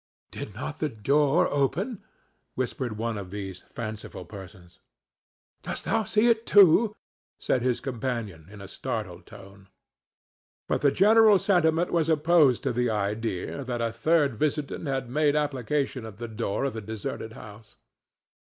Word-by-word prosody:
"Did 105 - -7
not 145 +6 -6
the 155 - 0
door 145 - +2
open?" 170 - -1 0.5
whispered 125 -3 -3
one 115 -1 -2
of 95 -2 -8
these 95 -2 -6
fanciful 110 -5 -7
persons. 90 -2 -12 0.8
"Didst - - -5
thou 220 +1 +1
see 215 +4 +2
it 230 -1 +2
too?" 205 +3 +6 0.4
said 130 - 0
his 125 -1 0
companion, 115 - -4
in 105 -1 -12
a 100 - -8
startled - - -5
tone. 100 0 -14 1.0
But - - 0
the 145 - +5
general 215 +3 +6
sentiment 175 -3 +2
was 165 -2 +1
opposed 155 -4 +4
to - - 0
the 125 0 +1
idea 105 +3 -2
that 125 -2 -3
a 115 -1 -1
third 140 0 +2
visitant 150 +2 -2
had 135 -2 -2
made 145 +3 +1
application 140 -2 -1
at 105 -3 -11
the 120 +1 -5
door 110 +2 -2
of 135 - -2
the 110 - -5
deserted 110 +1 -6
house. 105 0 -13
130 Hz, 150 wpm, -26 LUFS, 110-155 Hz, 1.0 s, too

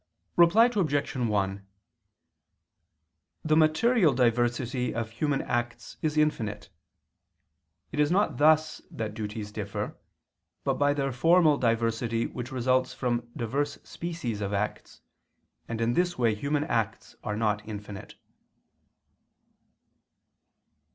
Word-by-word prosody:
Reply 175 +7 +6
Obj. 175 -12 0
1: 100 -5 -1 1.8
The 155 0 +3
material 160 - +4
diversity 120 +1 +1
of 115 -1 -3
human 140 +4 -1
acts 120 0 -3
is 155 -1 -1
infinite. 110 -9 0 1.2
It - - -4
is 150 0 +4
not 180 -7 +1
thus 155 +2 +3
that 110 -2 -5
duties 105 -1 -5
differ, - - -4 0.7
but - - 0
by 145 0 +3
their 135 -1 -1
formal 165 +4 +4
diversity 115 0 0
which 125 0 -6
results 130 0 +1
from 120 -2 -2
diverse 140 +5 -2
species 165 -11 -5
of 100 0 -2
acts, 105 +1 -3 0.7
and 115 -1 -4
in 115 +1 +1
this 175 +4 +1
way 115 -3 +2
human 145 +7 -1
acts 115 -7 -2
are 105 - -2
not 105 -2 0
infinite. 105 -1 -8
120 Hz, 110 wpm, -28 LUFS, 110-150 Hz, 1.8 s, Reply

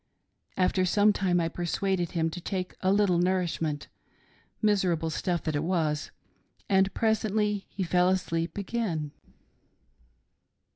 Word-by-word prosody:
After 185 0 +2
some 205 +3 +4
time 185 -3 +1
I 165 - +1
persuaded 175 +1 -1
him 165 -1 0
to 180 - -6
take 185 0 -3
a 185 - +2
little 200 -4 +3
nourishment 175 -5 0 0.4
— - - -36 0.4
miserable 180 -6 +2
stuff 175 +1 -1
that 155 - -2
it 145 - 0
was 160 -4 0 0.3
— - - -38
and 190 0 +3
presently 215 -2 0
he 195 - -3
fell 180 +1 +3
asleep 170 -2 -1
again. 190 -8 -2
180 Hz, 135 wpm, -28 LUFS, 165-195 Hz, 0.4 s, some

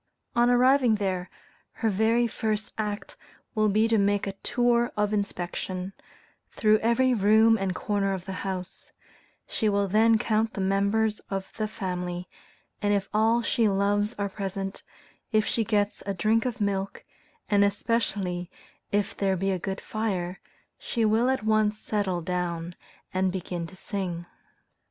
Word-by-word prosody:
On 240 0 +4
arriving 250 -1 +5
there, 190 -3 -2 0.4
her 225 -2 0
very 225 +4 +3
first 215 -2 -2
act 210 -1 -4 0.4
will 215 -2 +2
be 215 +3 +3
to 225 -1 +3
make 200 0 +2
a 195 - -2
tour 240 +3 +1
of 210 0 +1
inspection, 185 -1 -3 0.6
through 215 0 +3
every 250 +3 +3
room 220 +1 +5
and 195 -3 -1
corner 200 -2 0
of 190 -2 -4
the 195 - -5
house; 190 -2 -5 0.6
she 220 - 0
will 200 -1 +1
then 220 +3 +4
count 220 0 0
the - - -4
members 200 +3 +1
of 195 -1 -4
the 215 -1 -1
family, 180 -3 -4 0.5
and 205 - +1
if 195 -1 -2
all 225 +2 +3
she 230 -2 +2
loves 205 +2 +1
are 200 0 -1
present, 195 -1 -4 0.5
if 215 -1 +3
she 230 - 0
gets 205 -1 0
a 200 - -1
drink 220 +6 +2
of 250 -3 -2
milk, 200 -1 -2 0.4
and 205 -1 +4
especially 200 -4 -1 0.4
if 205 -1 0
there 195 -1 +1
be 195 +2 0
a 185 - -1
good 190 +2 -3
fire, 190 -5 -3 0.4
she 230 -2 -1
will 225 +4 +3
at 265 -4 0
once 215 -1 +2
settle 200 -5 -1
down 175 -1 -2 0.4
and 185 0 +1
begin 180 -2 -4
to 185 - -13
sing. 185 -4 -4
205 Hz, 155 wpm, -27 LUFS, 190-220 Hz, 0.6 s, arriving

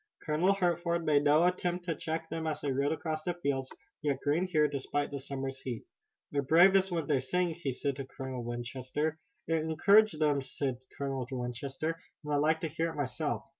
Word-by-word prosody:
Colonel 170 +6 +3
Hertford 170 -2 +1
made 145 -1 +3
no 150 +3 +6
attempt 180 0 0
to 170 - 0
check 160 +2 -3
them 160 0 -3
as 150 -1 -2
they 140 - -1
rode 140 +2 +1
across 160 -1 -2
the 175 +2 -2
fields, 140 -6 -1 0.3
yet 140 -3 0
green 155 +6 +1
here, 155 -4 +3
despite 145 +1 -2
the 140 - -3
summer's 135 0 -5
heat. 120 -4 -4 0.5
"They're 145 - +1
bravest 190 +6 +5
when 165 -3 -1
they 145 -2 +2
sing," 175 +7 0
he 155 -4 -3
said 135 +1 -2
to 135 - -4
Colonel 130 -2 -5
Winchester. 130 +6 -3 0.3
"It 165 - +1
encourages 160 +4 +4
them," 145 -3 +3
said 130 -2 -3 0.2
Colonel 135 -3 -2
Winchester, 135 +6 -3 0.2
"and 150 0 -2
I - - +4
like 155 +2 +2
to 165 - 0
hear 165 +2 -1
it - - -7
myself. 145 +1 -2
150 Hz, 195 wpm, -31 LUFS, 135-165 Hz, 0.5 s, no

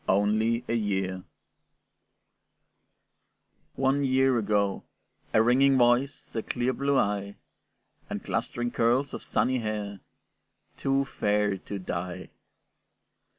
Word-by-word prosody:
"ONLY 110 +4 +2
A - - -1
YEAR" 95 -4 -1 2.5
One 135 +1 +1
year 130 -2 +3
ago, 100 -2 0 0.5
a 110 - +4
ringing 135 +3 +4
voice, 125 +3 +2
A 110 - 0
clear 125 +3 -1
blue 140 +1 +1
eye, 100 -2 0 0.7
And - - -4
clustering 120 0 -2
curls 125 +4 +1
of - - -6
sunny 130 0 +1
hair, 105 -3 -4 0.8
Too 135 0 +1
fair 105 -4 0
to 100 +2 -7
die. 90 -1 -5
115 Hz, 105 wpm, -27 LUFS, 100-130 Hz, 2.5 s, a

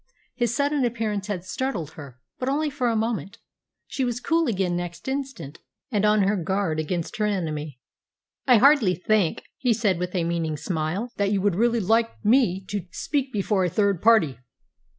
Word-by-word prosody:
His 240 -1 -1
sudden 285 0 +1
appearance 220 -4 -1
had 185 -4 -4
startled 185 - -3
her, 140 -7 -11 0.2
but 255 - -1
only 300 +2 0
for 255 -3 0
a 230 - 0
moment. 220 -2 -2 0.5
She 265 - -3
was 245 -1 -1
cool 330 +4 +1
again 190 -5 0
next 175 +3 -5
instant, 265 - -4 0.3
and 210 -2 +1
on 210 -1 +4
her 200 +2 +2
guard 190 -3 -1
against 165 +2 -3
her 210 -1 +1
enemy. 155 -8 -3 0.7
"I 250 -3 +7
hardly 255 -7 +5
think," 195 -1 +1 0.2
he 245 -3 +2
said, 205 -6 +1
with 180 +1 -3
a 175 - +1
meaning 165 -2 -1
smile, 180 +9 -3
"that 200 -1 +1
you 200 - +2
would 205 -1 +2
really 235 +5 +2
like 225 +3 +2 0.2
me 210 -5 +3
to 200 -3 -4
speak 275 +3 -2
before 200 -2 0
a 180 - +1
third 200 -1 +1
party." 200 - +4
205 Hz, 180 wpm, -24 LUFS, 175-240 Hz, 0.7 s, I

